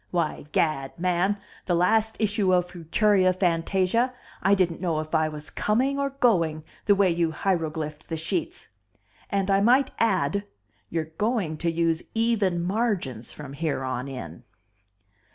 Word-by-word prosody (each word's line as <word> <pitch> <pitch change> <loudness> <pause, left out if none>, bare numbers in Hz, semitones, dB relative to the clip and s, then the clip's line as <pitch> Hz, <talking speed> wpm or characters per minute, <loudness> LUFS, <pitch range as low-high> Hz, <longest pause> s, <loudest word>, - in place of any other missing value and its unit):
Why, 165 -4 -2
Gad, 135 -4 0
man, 180 +3 +1 0.3
the 175 - +2
last 220 +5 +2
issue 205 -3 +2
of 180 0 0
Futuria 185 +2 +2
Fantasia 185 +7 +1 0.3
I 195 +1 +4
didn't 175 -3 0
know 165 -4 0
if 155 +1 -6
I 160 -1 +3
was 150 -1 -8
coming 260 +6 +1
or 280 0 +1
going, 175 - +1 0.2
the 205 - +5
way 195 -2 +3
you 170 -1 +1
heiroglyphed 155 -4 -2
the 165 - -2
sheets. 325 - -3 0.6
And 195 0 0
I 195 0 +4
might 255 +5 +4
add, 200 -3 +1 0.4
you're 160 -1 -3
going 210 -8 0
to 170 +1 0
use 165 0 +1
even 215 -7 +1
margins 180 - -1
from 140 -2 -9
here 150 -2 -2
on 130 0 -3
in." 85 - -8
180 Hz, 150 wpm, -26 LUFS, 160-210 Hz, 0.6 s, the